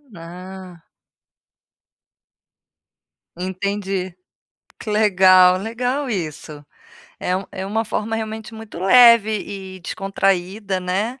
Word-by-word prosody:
Ah. 180 +1 -10 2.6
Entendi, 190 0 -3 0.7
que 220 - -6
legal, 185 -3 +5
legal 245 +6 -2
isso, 155 -5 -5 0.6
é 180 - 0
um 190 - -4
é 190 - -5
uma 220 +3 -1
forma 220 +1 -3
realmente 220 +1 -6
muito 220 -5 -10
leve 235 +1 +6 0.5
e 185 - -14
descontraída 195 +1 -1
né, 205 +8 -2
195 Hz, 90 wpm, -20 LUFS, 185-220 Hz, 2.6 s, leve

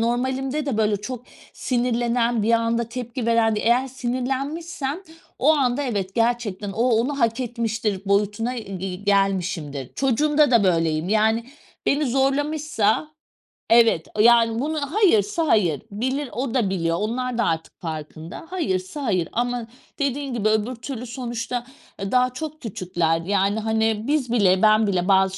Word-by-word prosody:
normalimde 260 +5 -1
de, 265 -6 -1
böyle, 215 -1 +2
çok 245 +4 -7 0.3
sinirlenen, 240 -2 0
bir 230 - +2
anda 230 0 +2
tepki 240 0 -5
veren 225 -2 +3
de - - 0
eğer 245 +3 +2
sinirlenmişsem 270 +5 -3 0.4
o 295 +5 +5
anda 270 -1 +1
evet 200 -7 -3
gerçekten 225 -4 -1
o 225 - -1
onu 250 +4 +1
hak 230 +2 +1
etmiştir 225 -4 -2
boyutuna 210 +4 +1
ge 195 -3 -5
gelmişimdir. 185 -9 -1
Çocuğumda 295 +3 +2
da 230 -5 +4
böyleyim 165 -2 +1
yani 220 +2 +2 0.4
beni 285 +1 +2
zorlamışsa, 275 -1 +1 0.6
evet, 230 -8 +5
yani 230 0 +5
bunu, 305 +4 -1
hayırsa 330 - +2
hayır 175 - +2
bilir 260 +6 -2
o 245 +1 -3
da 230 -7 +1
biliyor. 165 -3 0
Onlar 240 +3 -2
da 235 - +2
artık 160 0 -3
farkında 160 - -7
hayırsa 250 - -2
hayır 185 -9 0
ama 245 0 -1 0.3
dediğin 280 -1 -1
gibi 215 -3 +1
öbür 220 +3 0
türlü 240 +1 -6
sonuçta, 240 -1 -4 0.3
eee, 195 0 -4
daha 250 0 +3
çok 310 +3 -6
küçükler 175 -6 -1
yani, 200 +3 +1
hani, 220 0 0
biz 285 -5 0
bile, 190 -5 +3
ben 215 0 +5
bile 185 -2 0
bazı 190 -1 +3
230 Hz, 145 wpm, -23 LUFS, 200-255 Hz, 0.6 s, o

